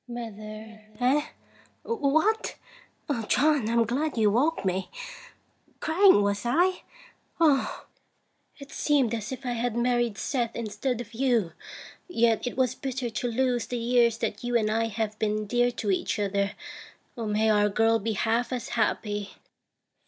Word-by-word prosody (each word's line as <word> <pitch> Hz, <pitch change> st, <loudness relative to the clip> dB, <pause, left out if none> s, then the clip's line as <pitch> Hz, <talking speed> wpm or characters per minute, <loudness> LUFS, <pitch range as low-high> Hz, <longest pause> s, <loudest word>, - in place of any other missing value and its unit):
Mother. 220 Hz, -2 st, -8 dB, 0.2 s
Eh! 275 Hz, +5 st, +2 dB, 0.6 s
What? 415 Hz, +2 st, +1 dB, 0.7 s
John, 285 Hz, -5 st, +3 dB
I'm 230 Hz, 0 st, +3 dB
glad 275 Hz, +5 st, -1 dB
you 215 Hz, -2 st, +4 dB
woke 270 Hz, +2 st, +1 dB
me. 190 Hz, 0 st, -1 dB, 0.9 s
Crying, 350 Hz, -, +5 dB
was 200 Hz, 0 st, 0 dB
I? 350 Hz, +10 st, +2 dB, 0.6 s
Oh! 295 Hz, -5 st, +2 dB, 0.7 s
it 280 Hz, -1 st, -12 dB
seemed 275 Hz, -6 st, +1 dB
as 225 Hz, 0 st, -4 dB
if 260 Hz, +1 st, -7 dB
I 245 Hz, -, -1 dB
had 240 Hz, -1 st, -1 dB
married 240 Hz, -3 st, +1 dB
Seth 240 Hz, -1 st, -2 dB
instead 235 Hz, +2 st, -2 dB
of 240 Hz, 0 st, -11 dB
you. 235 Hz, -7 st, +1 dB, 0.6 s
Yet 235 Hz, -8 st, +2 dB
it 245 Hz, -, -5 dB
was 255 Hz, -2 st, +2 dB
bitter 260 Hz, -2 st, -4 dB
to 225 Hz, +3 st, -2 dB
lose 245 Hz, 0 st, 0 dB
the 245 Hz, -, -3 dB
years 235 Hz, -1 st, +3 dB
that 210 Hz, -1 st, -3 dB
you 240 Hz, 0 st, +2 dB
and 215 Hz, -2 st, 0 dB
I 225 Hz, +1 st, +1 dB
have 215 Hz, -1 st, -3 dB
been 215 Hz, 0 st, 0 dB
dear 245 Hz, +3 st, +2 dB
to 210 Hz, -4 st, -1 dB
each 190 Hz, -, -1 dB
other. 200 Hz, -1 st, 0 dB, 0.6 s
May 220 Hz, -1 st, +1 dB
our 210 Hz, 0 st, +3 dB
girl 225 Hz, +2 st, +3 dB
be 220 Hz, +2 st, -2 dB
half 230 Hz, +4 st, 0 dB
as 250 Hz, 0 st, -3 dB
happy 210 Hz, -3 st, -1 dB
235 Hz, 145 wpm, -27 LUFS, 215-255 Hz, 0.9 s, Crying